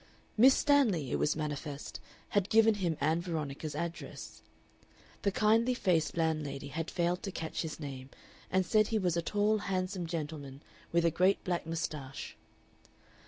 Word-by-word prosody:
Miss 260 +4 +7
Stanley, 225 - +3
it - - 0
was 150 - +2
manifest, 150 -1 -5 0.3
had 200 -1 +1
given 225 0 +6
him 175 -6 -1
Ann 160 +2 +1
Veronica's 155 -3 -4
address. 170 +2 -6 0.8
The 200 - +1
kindly 225 +5 +3
faced 170 -8 +1
landlady 150 -4 -1
had 165 +3 -3
failed 175 +1 0
to 195 - -4
catch 160 -3 -4
his 160 -2 -5
name, 135 -3 -7 0.4
and 185 0 +2
said 215 +4 +3
he 225 - 0
was 180 -5 +1
a 170 - +1
tall, 210 +4 +1
handsome 185 -2 -2
gentleman 150 -4 -5 0.3
with 170 0 +3
a 165 - +4
great 185 +5 +2
black 175 -3 -2
mustache. 150 -4 -4
170 Hz, 155 wpm, -32 LUFS, 155-200 Hz, 0.8 s, Miss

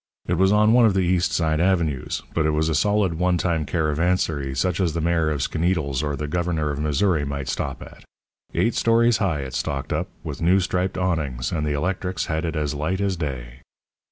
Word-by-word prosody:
It - - 0
was 95 +1 +3
on 105 +1 +4
one 120 -2 +6
of 100 - +1
the 95 - +3
East 90 +1 +1
Side 80 -2 +1
avenues; 85 -7 0
but 80 -1 +1
it - - +2
was 80 +1 +1
a - - 0
solid, 100 -3 +1
old 90 -1 +2
time 80 -4 -1
caravansary 80 -3 0
such 90 +5 0
as 85 -5 +1
the 85 - -2
Mayor 80 -1 +1
of 75 -4 -1
Skaneateles 80 -6 0
or 75 -1 -2
the 75 +2 -4
Governor 80 -2 -1
of 70 - -4
Missouri 75 +2 +1
might 70 -1 -4
stop - - -3
at. - - -14 0.5
Eight 115 - +2
stories 115 0 +3
high 90 -9 0
it 65 -1 -7
stalked 70 +1 -2
up, - - -1 0.2
with - - -6
new 90 +4 +4
striped 90 0 -1
awnings, 75 -9 -1
and 75 -3 -1
the 75 - 0
electrics 90 +4 -2
had 80 +1 -2
it 80 -1 -3
as 75 -1 -1
light 80 +6 -2
as 100 -2 0
day. 65 -7 -5
80 Hz, 210 wpm, -23 LUFS, 75-95 Hz, 0.5 s, one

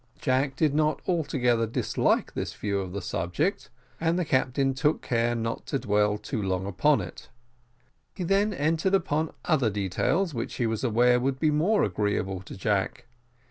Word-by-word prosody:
Jack 135 +1 +1
did 150 -1 +2
not 155 +1 +1
altogether 125 -9 +1
dislike 110 - 0
this - - -4
view 100 -1 -2
of 95 -2 -5
the 100 0 -5
subject, 90 - -2 0.3
and 165 +1 +1
the 180 - 0
captain 135 0 +1
took 145 +4 0
care 120 0 +1
not 115 0 -3
to 140 - 0
dwell 105 -3 +1
too 115 +1 -4
long 95 -1 -1
upon 100 +10 +2
it. - - -9 0.9
He 185 - -4
then 195 +4 +2
entered 165 +3 +1
upon 160 -4 0
other 140 -9 +2
details, 105 - 0
which 115 -2 -4
he 120 - 0
was 110 +1 -2
aware 125 +1 +4
would 130 +1 -1
be 155 +2 +2
more 175 +9 +2
agreeable 95 -1 -1
to 95 - -10
Jack. 105 +4 -1
130 Hz, 170 wpm, -27 LUFS, 105-155 Hz, 0.9 s, aware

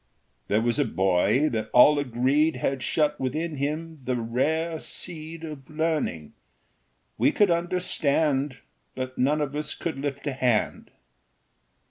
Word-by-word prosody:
There 105 +2 +2
was 120 +4 0
a - - +5
boy 95 - +2
that 110 -2 -3
all 145 +4 +7
agreed 140 +4 +2
Had 130 +1 -1
shut 150 +2 +1
within 150 +4 -2
him 155 +3 -3
the 125 +1 -1
rare 155 +8 -1
seed 165 -1 -6
Of 150 -4 -8
learning. 155 - -2 0.9
We - - +4
could 205 -4 +3
understand, 155 -5 +1 0.4
But 130 0 -5
none 145 +4 +2
of 145 -1 -2
us 150 0 -3
could 160 -5 -4
lift 140 0 -4
a 145 - -1
hand. 125 -4 0
145 Hz, 135 wpm, -26 LUFS, 125-155 Hz, 0.9 s, all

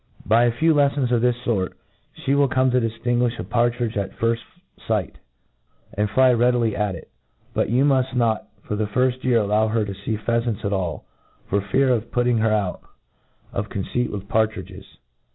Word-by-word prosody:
By 115 +3 +4
a 120 - +3
few 160 +7 +2
leffons 140 -3 +2
of 120 -2 +2
this 125 0 +3
fort 95 -6 -1 0.4
ihe 135 - 0
will 140 0 +4
come 130 0 +2
to 125 0 +2
diflinguiOi 120 +1 0
a - - -4
partridge 120 -1 0
at 100 -2 -3
firft 115 0 +1 0.5
fight, 105 -5 -1 0.8
and 105 +1 0
fly 130 +3 +4
readily 120 -2 +2
at 105 -3 -1
it; 85 - -12 0.4
but - - 0
you 125 +5 +3
muft 130 -2 +2
not 115 -3 +1 0.2
for 105 - -3
the 105 0 -1
firft 125 +3 0
year 125 -2 +3
allow 105 0 +2
her 110 -1 0
to 100 - -5
fee 100 +3 -4
pheafants 115 -1 -1
at 100 - 0
all, 90 -5 -3 0.4
for 100 - +1
fear 130 +8 +1
of 115 -2 0
putting 120 -1 +2
hereout 110 -4 0 0.7
of 100 +1 -3
conceit. 120 +5 -2
vnith 100 -1 -6
partridges. 110 0 -1
115 Hz, 180 wpm, -22 LUFS, 105-125 Hz, 0.8 s, By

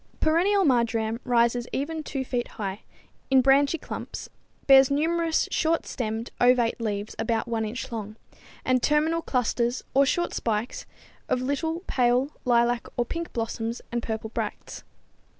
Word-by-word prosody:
_ - - -35
Perennial 370 +5 +3
marjoram 230 -4 +1
rises 240 0 +2
even 315 +4 -2
2 275 -3 -4
feet 245 -1 -2
high, 200 -1 -4 0.5
in 265 -1 +6
branchy 280 +4 +4
clumps, - - -7 0.4
bears 270 -1 +7
numerous 325 +3 +1
short 325 0 +1
stemmed, 225 -1 -4
ovate 245 -1 +3
leaves 210 -2 -3
about 225 +1 0
1 230 -1 -1
inch 240 +4 -5
long, 215 -2 -5 0.5
and 255 -1 +2
terminal 310 +4 +2
clusters 245 -3 0
or 275 - +5
short 345 +6 0
spikes 225 +1 -2 0.4
of - - +2
little, 320 +6 -2
pale 250 +2 +2
lilac 240 -1 +2
or 240 - +1
pink 335 +6 -5
blossoms 230 0 -3
and 240 0 -1
purple 220 -1 -4
bracts. - - -5
245 Hz, 145 wpm, -26 LUFS, 230-285 Hz, 0.5 s, bears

